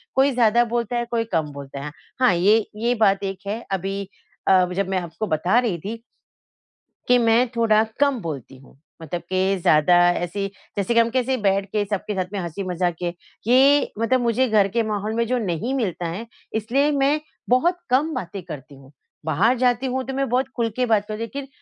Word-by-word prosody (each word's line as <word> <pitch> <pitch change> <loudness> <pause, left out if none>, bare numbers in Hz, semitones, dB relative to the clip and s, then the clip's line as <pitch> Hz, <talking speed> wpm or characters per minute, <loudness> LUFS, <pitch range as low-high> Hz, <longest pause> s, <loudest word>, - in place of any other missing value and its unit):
कोई 270 +1 +4
ज़्यादा 240 -1 +4
बोलता 235 0 -2
है, 240 - -1
कोई 230 -1 +1
कम 155 -2 0
बोलता 140 0 -8
है। 150 - -5 0.3
हाँ 255 -5 +5
ये, 205 +5 +4
ये 235 +3 0
बात 200 -3 +2
एक 195 -1 -3
है 220 +4 -3
अभी 195 +1 -3 0.4
अ, 185 -1 +5
जब 195 +1 -1
मैं 190 -1 +1
आपको 175 +4 -5
बता 175 +6 +1
रही 225 -8 -1
थी 225 +7 -6 1.1
कि 250 - +5
मैं 235 +1 +3
थोड़ा 220 -2 +4 0.2
कम 280 -3 +2
बोलती 140 -6 -6
हूँ। 135 0 -19 0.2
मतलब 165 +2 -4
कि 190 +1 +1
ज़्यादा 155 0 +4 0.2
ऐसी 175 +3 -3 0.3
जैसे 200 +3 0
कि 235 - +5
हम 230 0 +3
कैसे 255 +1 0
बैठ 195 0 +2
के 210 -1 +1
सबके 205 +1 -3
साथ 185 -1 -1
में 200 - -2
हँसी 175 +2 -4
मज़ाक 180 -1 -1
किए, 175 -1 -2 0.3
ये 275 +4 +5
मतलब 250 +3 +2
मुझे 240 +2 +2
घर 210 -2 +4
के 230 - +3
माहौल 215 0 -2
में 235 0 +1
जो 250 +2 +1
नहीं 215 +3 -2
मिलता 185 -9 -2
है 185 +8 -5 0.3
इसलिए 255 +7 +1
मैं 285 +1 +2 0.3
बहुत 330 +9 +3
कम 290 +6 +2
बातें 190 - -5
करती 150 -4 -9
हूँ। 135 0 -17 0.3
बाहर 200 - +2
जाती 250 +1 +1
हूँ 260 0 -1
तो 270 - -5
मैं 275 0 -1
बहुत 250 +2 +1
खुल 235 -2 0
के 255 - +2
बात 220 -3 +2
करती 215 - -4
हूँ, - - -4
लेकिन 275 +3 -7
215 Hz, 205 wpm, -22 LUFS, 185-245 Hz, 1.1 s, हाँ